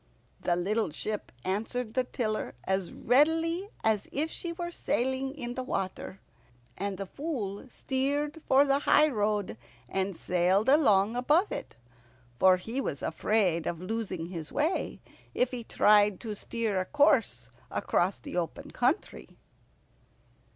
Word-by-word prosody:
The 175 Hz, -, +1 dB
little 205 Hz, +4 st, 0 dB
ship 210 Hz, +7 st, -5 dB
answered 220 Hz, +4 st, -2 dB
the 255 Hz, -, +2 dB
tiller 215 Hz, -, -3 dB
as 190 Hz, -2 st, -1 dB
readily 325 Hz, -, +2 dB
as 220 Hz, -2 st, +1 dB
if 310 Hz, +3 st, -1 dB
she 345 Hz, -, -4 dB
were 345 Hz, 0 st, -5 dB
sailing 265 Hz, -2 st, -1 dB
in 245 Hz, -4 st, -4 dB
water, 195 Hz, -6 st, -4 dB, 0.6 s
and 200 Hz, 0 st, -3 dB
the 195 Hz, -, -4 dB
Fool 250 Hz, -, -5 dB
steered 285 Hz, +5 st, -2 dB
for 275 Hz, +2 st, +6 dB
the 275 Hz, 0 st, +2 dB
highroad, 210 Hz, -, +2 dB, 0.3 s
and 190 Hz, +3 st, -2 dB
sailed 185 Hz, +6 st, +2 dB
along 220 Hz, -7 st, +4 dB
above 300 Hz, +10 st, +2 dB
it, -, -, -6 dB, 0.6 s
for 185 Hz, -1 st, +6 dB
he 230 Hz, +8 st, -3 dB
was 140 Hz, -, -4 dB
afraid 180 Hz, -2 st, +1 dB
of 170 Hz, -, -2 dB
losing 190 Hz, -3 st, -3 dB
his 165 Hz, -4 st, -6 dB
way 310 Hz, +5 st, -1 dB, 0.3 s
if 250 Hz, +1 st, +2 dB
he 245 Hz, -2 st, -5 dB
tried 210 Hz, -3 st, +4 dB
to 220 Hz, -2 st, -4 dB
steer 220 Hz, -2 st, -2 dB
a 185 Hz, -, -1 dB
course 230 Hz, -, +2 dB, 0.2 s
across 185 Hz, +3 st, 0 dB
the -, -, -9 dB
open 175 Hz, -2 st, -3 dB
country. -, -, -1 dB
220 Hz, 135 wpm, -29 LUFS, 190-275 Hz, 0.6 s, for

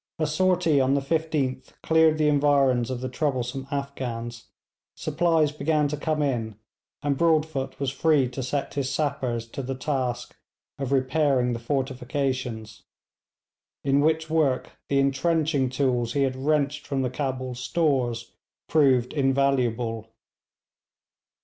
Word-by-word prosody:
A 155 Hz, -, 0 dB
sortie 165 Hz, -2 st, +2 dB
on 130 Hz, +1 st, +2 dB
the -, -, +3 dB
15th 140 Hz, -3 st, -2 dB
cleared 160 Hz, -1 st, +4 dB
the 155 Hz, -1 st, +2 dB
environs 140 Hz, -4 st, +3 dB
of 125 Hz, -1 st, -4 dB
the 130 Hz, -, -2 dB
troublesome 130 Hz, -1 st, -2 dB
Afghans, 125 Hz, -5 st, -4 dB, 0.5 s
supplies 165 Hz, -4 st, +1 dB
began 150 Hz, 0 st, +1 dB
to 150 Hz, -, -2 dB
come 155 Hz, +1 st, -1 dB
in, 115 Hz, -6 st, -1 dB, 0.5 s
and 145 Hz, -1 st, +1 dB
Broadfoot 155 Hz, -3 st, 0 dB
was 140 Hz, -2 st, -1 dB
free 145 Hz, -1 st, +3 dB
to 130 Hz, +2 st, -5 dB
set 135 Hz, +3 st, -2 dB
his 140 Hz, -2 st, -1 dB
sappers 130 Hz, -6 st, -1 dB
to 140 Hz, -, -5 dB
the 135 Hz, 0 st, -4 dB
task 130 Hz, -3 st, -3 dB, 0.4 s
of 135 Hz, -1 st, -3 dB
repairing 130 Hz, -2 st, +2 dB
the 115 Hz, -, -3 dB
fortifications, 130 Hz, -3 st, -3 dB, 1.0 s
in 140 Hz, 0 st, +3 dB
which 160 Hz, +1 st, +1 dB
work 155 Hz, -5 st, +1 dB, 0.2 s
the 140 Hz, -, +2 dB
entrenching 140 Hz, 0 st, +1 dB
tools 125 Hz, -3 st, 0 dB
he 140 Hz, -, +2 dB
had 130 Hz, -1 st, 0 dB
wrenched 150 Hz, +1 st, 0 dB
from 135 Hz, -1 st, -1 dB
the 125 Hz, -, -1 dB
Cabul 130 Hz, -2 st, -3 dB
stores 125 Hz, -3 st, -1 dB, 0.3 s
proved 130 Hz, -5 st, +3 dB
invaluable. 125 Hz, -5 st, +1 dB
135 Hz, 130 wpm, -25 LUFS, 125-150 Hz, 1.0 s, cleared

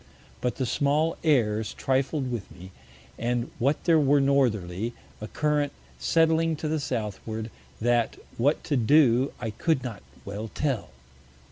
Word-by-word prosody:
But 125 Hz, -, -1 dB
the 130 Hz, -, -1 dB
small 150 Hz, +6 st, +1 dB
Airs 110 Hz, -8 st, +2 dB
trifled 135 Hz, 0 st, 0 dB
with 115 Hz, -5 st, -4 dB
me, 90 Hz, +3 st, -12 dB, 0.5 s
and 120 Hz, +1 st, -1 dB
what 140 Hz, +5 st, +1 dB
there 165 Hz, -2 st, +5 dB
were 145 Hz, 0 st, +4 dB
Northerly, 115 Hz, -7 st, +1 dB, 0.3 s
a 110 Hz, -, -4 dB
Current 150 Hz, +1 st, 0 dB, 0.3 s
setting 165 Hz, -, +3 dB
to 155 Hz, +1 st, -4 dB
the 155 Hz, 0 st, 0 dB
Southward, 110 Hz, -3 st, -4 dB, 0.3 s
that 120 Hz, 0 st, +1 dB, 0.2 s
what 140 Hz, +6 st, +1 dB
to 150 Hz, -, -1 dB
do 130 Hz, 0 st, +4 dB
I 115 Hz, -3 st, -3 dB
could 145 Hz, +4 st, 0 dB
not 115 Hz, -7 st, -6 dB, 0.2 s
well 105 Hz, +3 st, -5 dB
tell. 135 Hz, -8 st, -1 dB
130 Hz, 140 wpm, -27 LUFS, 110-150 Hz, 0.5 s, there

